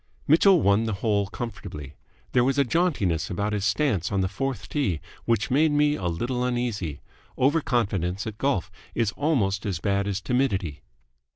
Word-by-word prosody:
Mitchell 175 Hz, +3 st, +5 dB
won 100 Hz, +3 st, +3 dB
the 110 Hz, -, -1 dB
hole 100 Hz, -2 st, +2 dB
comfortably. 100 Hz, -, -7 dB, 0.4 s
There 125 Hz, -, +4 dB
was 135 Hz, +2 st, +1 dB
a 140 Hz, -, +5 dB
jauntiness 120 Hz, -, 0 dB
about 105 Hz, +3 st, -1 dB
his 105 Hz, -1 st, -1 dB
stance 110 Hz, -, +1 dB
on 95 Hz, -1 st, +1 dB
the 95 Hz, -, +1 dB
fourth 110 Hz, -2 st, -3 dB
tee 100 Hz, -, -1 dB, 0.3 s
which 115 Hz, 0 st, +1 dB
made 150 Hz, +4 st, +4 dB
me 145 Hz, 0 st, +3 dB
a 95 Hz, -12 st, -2 dB
little 120 Hz, +9 st, -1 dB
uneasy. 120 Hz, -, -2 dB, 0.4 s
Over 145 Hz, +5 st, +3 dB
confidence 100 Hz, -, -1 dB
at 110 Hz, -1 st, -6 dB
golf 135 Hz, -11 st, 0 dB, 0.2 s
is 115 Hz, -3 st, +1 dB
almost 110 Hz, -11 st, 0 dB
as 100 Hz, -5 st, -2 dB
bad 100 Hz, +4 st, 0 dB
as 100 Hz, -1 st, -1 dB
timidity. 100 Hz, -, -1 dB
110 Hz, 170 wpm, -25 LUFS, 95-135 Hz, 0.4 s, Mitchell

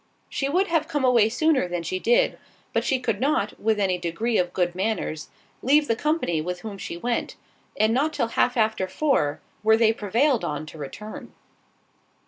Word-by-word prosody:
She 275 Hz, -, -2 dB
would 365 Hz, +6 st, +2 dB
have 330 Hz, -4 st, 0 dB
come 290 Hz, -4 st, 0 dB
away 235 Hz, -4 st, +5 dB
sooner 280 Hz, -, +2 dB
than 175 Hz, -1 st, -3 dB
she 185 Hz, +2 st, -2 dB
did, 240 Hz, +5 st, +2 dB, 0.3 s
but -, -, +1 dB
she 265 Hz, -3 st, +1 dB
could 225 Hz, -5 st, -1 dB
not, 265 Hz, -7 st, 0 dB
with 220 Hz, 0 st, +1 dB
any 185 Hz, -3 st, +1 dB
degree 195 Hz, +7 st, -1 dB
of 180 Hz, -1 st, 0 dB
good 175 Hz, -1 st, 0 dB
manners, 185 Hz, -5 st, -2 dB, 0.3 s
leave 295 Hz, +3 st, +3 dB
the 230 Hz, -, +2 dB
company 295 Hz, -, 0 dB
with 180 Hz, +2 st, -4 dB
whom 205 Hz, -3 st, -7 dB
she 170 Hz, -, -5 dB
went; 235 Hz, +6 st, -2 dB, 0.4 s
and 215 Hz, +1 st, +3 dB
not 290 Hz, +6 st, +1 dB
till 235 Hz, -6 st, -1 dB
half 245 Hz, +2 st, +1 dB
after 220 Hz, -4 st, +1 dB
four, 185 Hz, -, 0 dB, 0.2 s
were 220 Hz, +1 st, +4 dB
they 225 Hz, -1 st, +4 dB
prevailed 230 Hz, +5 st, +1 dB
on 150 Hz, +1 st, -3 dB
to 155 Hz, +1 st, -11 dB
return. 210 Hz, +10 st, -8 dB
220 Hz, 185 wpm, -24 LUFS, 180-260 Hz, 0.4 s, away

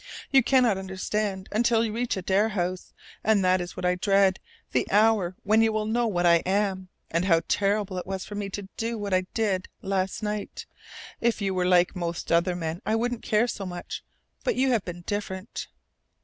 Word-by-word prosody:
"You 270 Hz, -, +7 dB
cannot 245 Hz, -5 st, +3 dB
understand 190 Hz, +1 st, -3 dB
until 230 Hz, +1 st, +3 dB
you 215 Hz, -, -3 dB
reach 235 Hz, -2 st, -1 dB
Adare 195 Hz, +3 st, +1 dB
House. 180 Hz, -1 st, -2 dB, 0.3 s
And 210 Hz, -3 st, +3 dB
that 185 Hz, 0 st, +3 dB
is 175 Hz, 0 st, -7 dB
what -, -, -3 dB
I 180 Hz, -, +3 dB
dread, 195 Hz, 0 st, +3 dB, 0.3 s
the -, -, 0 dB
hour 205 Hz, -3 st, +3 dB
when 215 Hz, +2 st, +4 dB
you 225 Hz, 0 st, +3 dB
will 215 Hz, 0 st, -1 dB
know 235 Hz, +2 st, +1 dB
what 175 Hz, -5 st, 0 dB
I 170 Hz, -1 st, +7 dB
am, 190 Hz, +1 st, -1 dB, 0.2 s
and 170 Hz, +2 st, +1 dB
how 165 Hz, -3 st, +4 dB
terrible 200 Hz, -2 st, 0 dB
it 180 Hz, -, -8 dB
was 190 Hz, -1 st, -4 dB
for -, -, -9 dB
me 205 Hz, -1 st, -3 dB
to 195 Hz, 0 st, -6 dB
do 230 Hz, +1 st, -2 dB
what 205 Hz, -2 st, -3 dB
I 185 Hz, 0 st, +2 dB
did 200 Hz, -5 st, 0 dB, 0.2 s
last 190 Hz, +1 st, -1 dB
night. 210 Hz, -1 st, -4 dB, 0.5 s
If 235 Hz, -1 st, +1 dB
you 195 Hz, -2 st, -1 dB
were 180 Hz, -1 st, +1 dB
like 180 Hz, 0 st, +4 dB
most 170 Hz, -1 st, -4 dB
other 170 Hz, +2 st, +3 dB
men, 165 Hz, 0 st, -4 dB
I 220 Hz, -, 0 dB
wouldn't 240 Hz, +1 st, -1 dB
care 215 Hz, +2 st, +2 dB
so 210 Hz, -, -4 dB
much. 175 Hz, -1 st, -6 dB, 0.4 s
But -, -, +1 dB
you 260 Hz, +1 st, +2 dB
have 225 Hz, -5 st, +2 dB
been 175 Hz, -1 st, -7 dB
different." 205 Hz, 0 st, -4 dB
195 Hz, 200 wpm, -26 LUFS, 185-215 Hz, 0.5 s, You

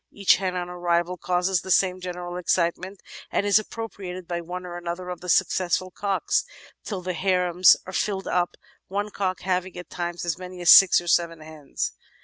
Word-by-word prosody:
Each 200 Hz, -1 st, +3 dB
hen 185 Hz, -1 st, -2 dB
on 175 Hz, -1 st, -3 dB
arrival 175 Hz, 0 st, -1 dB
causes 180 Hz, +1 st, 0 dB
the 190 Hz, -, -10 dB
same 185 Hz, 0 st, +2 dB
general 180 Hz, -1 st, -6 dB
excitement 180 Hz, +2 st, -1 dB, 0.3 s
and -, -, 0 dB
is 205 Hz, +1 st, +5 dB
appropriated 195 Hz, -5 st, -7 dB
by 175 Hz, -1 st, -3 dB
one 180 Hz, +2 st, -7 dB
or 175 Hz, 0 st, -7 dB
other 180 Hz, +1 st, -5 dB
of 180 Hz, -1 st, -6 dB
the 180 Hz, -, -7 dB
successful 185 Hz, 0 st, +1 dB
cocks 200 Hz, +1 st, 0 dB, 0.4 s
till 195 Hz, -4 st, -5 dB
the 185 Hz, 0 st, -2 dB
harems 180 Hz, -1 st, +4 dB
are 185 Hz, -, -8 dB
filled 195 Hz, 0 st, -2 dB
up, 175 Hz, -1 st, 0 dB, 0.3 s
one 205 Hz, +2 st, -3 dB
cock 185 Hz, -2 st, -2 dB
having 185 Hz, -1 st, -2 dB
at 180 Hz, -, -9 dB
times 175 Hz, 0 st, -4 dB
as 170 Hz, 0 st, -2 dB
many 180 Hz, 0 st, -9 dB
as 175 Hz, -, +6 dB
six 195 Hz, -2 st, +8 dB
or 175 Hz, -, -10 dB
seven 170 Hz, -1 st, +1 dB
hens. 155 Hz, -2 st, -5 dB
180 Hz, 185 wpm, -24 LUFS, 175-190 Hz, 0.4 s, six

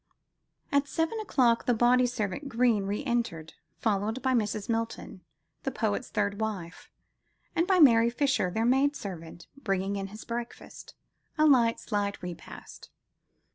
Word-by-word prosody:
At 280 Hz, 0 st, +2 dB
seven 325 Hz, +9 st, -1 dB
o'clock 255 Hz, -, +2 dB
the 245 Hz, -, +3 dB
body 245 Hz, +2 st, +4 dB
servant 240 Hz, +3 st, -3 dB
Greene 230 Hz, -4 st, +2 dB
re 205 Hz, +6 st, -2 dB
entered, 230 Hz, -, -2 dB, 0.2 s
followed 215 Hz, +1 st, -1 dB
by 260 Hz, -1 st, +2 dB
Mrs. 215 Hz, -3 st, -1 dB
Milton, 230 Hz, -4 st, -3 dB, 0.4 s
the -, -, -2 dB
poet's 225 Hz, -1 st, -2 dB
third 200 Hz, 0 st, -1 dB
wife, 190 Hz, -6 st, -5 dB, 0.7 s
and 340 Hz, +1 st, +2 dB
by 380 Hz, -, +3 dB
Mary 235 Hz, -8 st, +6 dB
Fisher, 270 Hz, -6 st, +1 dB
their 220 Hz, +5 st, -1 dB
maid 270 Hz, +4 st, +3 dB
servant, 170 Hz, -, -8 dB
bringing 195 Hz, -6 st, -2 dB
in 195 Hz, 0 st, -4 dB
his 210 Hz, +3 st, -11 dB
breakfast, 235 Hz, 0 st, -7 dB, 0.4 s
a 310 Hz, -, +4 dB
light, 240 Hz, -6 st, +4 dB
slight 205 Hz, -2 st, -2 dB
repast. 175 Hz, -2 st, -9 dB
230 Hz, 140 wpm, -28 LUFS, 200-260 Hz, 0.7 s, Mary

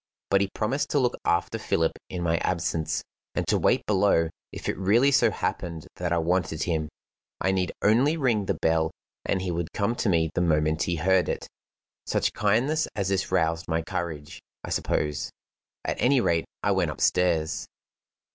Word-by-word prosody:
But 100 Hz, 0 st, +5 dB
he 100 Hz, -, 0 dB
promised 125 Hz, +7 st, -1 dB
to 145 Hz, -, +2 dB
look 125 Hz, -2 st, +1 dB
after 90 Hz, +6 st, +1 dB
Philip 80 Hz, -6 st, +1 dB, 0.2 s
in 90 Hz, -1 st, -4 dB
my 85 Hz, -1 st, +2 dB
absence, 85 Hz, -3 st, -1 dB, 0.3 s
and -, -, 0 dB
to -, -, +2 dB
wait -, -, +2 dB
below 95 Hz, -5 st, +3 dB, 0.2 s
if -, -, -7 dB
it -, -, 0 dB
really 115 Hz, +9 st, +3 dB
so 125 Hz, -4 st, +5 dB
happened 85 Hz, -5 st, -3 dB
that 90 Hz, -1 st, -2 dB
I 85 Hz, -, +2 dB
wanted 85 Hz, -1 st, 0 dB
him. 80 Hz, -3 st, -1 dB, 0.5 s
I 95 Hz, -, +1 dB
need 95 Hz, -1 st, 0 dB
only 130 Hz, +10 st, +4 dB
ring 115 Hz, -9 st, +1 dB
the -, -, +1 dB
bell, 80 Hz, 0 st, +2 dB, 0.4 s
and 95 Hz, -1 st, 0 dB
he 90 Hz, -, -1 dB
would 85 Hz, -1 st, -3 dB
come 105 Hz, +3 st, 0 dB
to 110 Hz, -, +1 dB
me 80 Hz, -3 st, +2 dB
the -, -, 0 dB
moment 80 Hz, -2 st, +2 dB
he 90 Hz, -, 0 dB
heard 90 Hz, +3 st, +2 dB
it. -, -, -3 dB, 0.6 s
Such -, -, +1 dB
kindness 120 Hz, +10 st, +2 dB
as 100 Hz, -2 st, -1 dB
this 95 Hz, -1 st, -1 dB
roused 80 Hz, -2 st, +1 dB
my 80 Hz, 0 st, 0 dB
courage, 80 Hz, -5 st, -5 dB, 0.2 s
I -, -, -6 dB
suppose. 75 Hz, -1 st, -1 dB, 0.6 s
At -, -, -2 dB
any 135 Hz, +2 st, +4 dB
rate, 85 Hz, -8 st, +1 dB, 0.2 s
I -, -, +2 dB
went -, -, +1 dB
upstairs. 85 Hz, -3 st, +1 dB
90 Hz, 180 wpm, -26 LUFS, 80-105 Hz, 0.6 s, But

